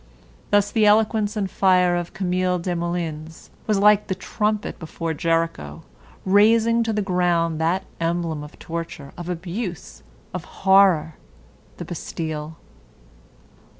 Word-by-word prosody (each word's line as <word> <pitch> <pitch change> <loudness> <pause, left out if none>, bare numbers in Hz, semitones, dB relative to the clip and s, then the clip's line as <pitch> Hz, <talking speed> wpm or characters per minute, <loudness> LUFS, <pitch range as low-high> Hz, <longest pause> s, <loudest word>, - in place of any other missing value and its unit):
Thus 205 0 +3
the 215 -2 +3
eloquence 215 0 +2
and 200 -2 0
fire 180 -2 +3
of 175 -1 -3
Camille 185 -1 0
Desmoulins 170 -3 -4 0.2
was 215 -2 +2
like 210 +1 +4
the 190 - -2
trumpet 210 +2 -2
before 165 0 -4
Jericho, 165 - -2 0.4
razing 225 +4 +4
to 225 - 0
the 210 -1 -1
ground 175 -4 +1
that 175 +4 +1 0.2
emblem 165 -2 -1
of 150 - -12
torture, 165 -4 -7
of 175 0 -7
abuse, 180 +1 -5 0.3
of - - -4
horror, 190 -6 +3 0.6
the - - -6
Bastille. 155 -1 -5
180 Hz, 120 wpm, -22 LUFS, 165-200 Hz, 0.6 s, like